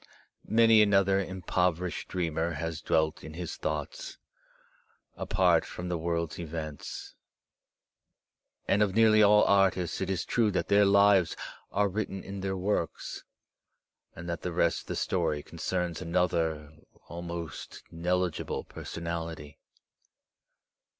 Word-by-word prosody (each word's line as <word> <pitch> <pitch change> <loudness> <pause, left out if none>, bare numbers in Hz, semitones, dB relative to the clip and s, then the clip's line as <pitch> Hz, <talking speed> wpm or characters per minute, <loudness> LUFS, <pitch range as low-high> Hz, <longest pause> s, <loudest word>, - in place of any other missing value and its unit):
Many 115 -1 +6
another 100 -2 +4
impoverished 90 -2 -1
dreamer 85 -2 -1
has 80 +1 -4
dwelt 80 -1 0
in 80 - -9
his 90 0 -5
thoughts, - - -4 1.0
apart 90 -4 +2
from 90 0 -7
the 90 - -1
world's 85 0 -2
events. 80 -3 -6 1.5
And 100 - +3
of 100 -2 +2
nearly 110 -1 +6
all 105 0 +6
artists 95 -4 +2
it 95 - -2
is 95 -3 -1
true 115 -3 +2
that - - -1
their 100 0 +5
lives 100 -3 +4 0.3
are 100 +1 +2
written 95 -1 -3
in 100 +1 -7
their 95 0 -2
works, 95 -3 -2 0.9
and 85 +1 -8
that 85 -1 -3
the 90 - -3
rest 85 0 +1
of - - -20
the - - -3
story 80 -5 -1
concerns 90 -2 -3
another 80 -3 0 0.3
almost 85 -1 -7
negligible 90 0 -1
personality. 80 -3 -6
90 Hz, 120 wpm, -29 LUFS, 85-100 Hz, 1.5 s, Many